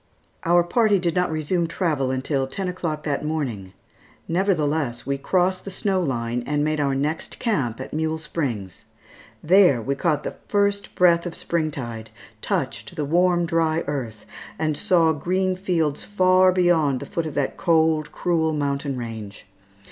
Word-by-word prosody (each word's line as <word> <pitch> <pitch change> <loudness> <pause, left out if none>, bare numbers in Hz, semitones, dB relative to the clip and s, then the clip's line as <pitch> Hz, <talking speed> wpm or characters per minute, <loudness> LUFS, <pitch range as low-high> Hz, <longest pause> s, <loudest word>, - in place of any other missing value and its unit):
Our 175 +1 +5
party 215 +3 +3
did 175 -2 0
not 180 0 +1
resume 160 +2 0
travel 155 -6 -1
until 135 +1 -1
ten 185 +8 -3
o'clock 165 -4 -3
that 145 -2 -2
morning; 125 -12 -3 0.5
nevertheless, 155 - 0
we 140 +1 -2
crossed 185 +4 +1
the - - -6
snow 190 0 0
line 120 -5 -2
and 145 0 0
made 155 0 0
our 140 -2 +1
next 150 +4 -2
camp 140 - -1
at 130 - -7
Mule 160 +1 -1
Springs. 125 - -4 0.6
There 180 -6 +5
we 135 +5 -1
caught 150 0 0
the - - -5
first 200 0 0
breath 170 -1 +4
of 170 - -6
spring 165 -2 -1
tide, 115 -6 -6 0.3
touched - - -3
the 150 - -2
warm, 175 +3 +2
dry 165 -1 +1
earth, 120 -7 -5 0.3
and 155 -1 0
saw 165 0 +3
green 185 +5 0
fields 170 -6 -1
far 185 -2 +4
beyond 170 -7 +2
the - - -7
foot 165 -1 -3
of 155 - -7
that 145 - -1
cold, 160 -3 +2
cruel 160 -3 0
mountain 140 -2 -2
range. 110 -4 -7
160 Hz, 160 wpm, -23 LUFS, 140-180 Hz, 0.6 s, Our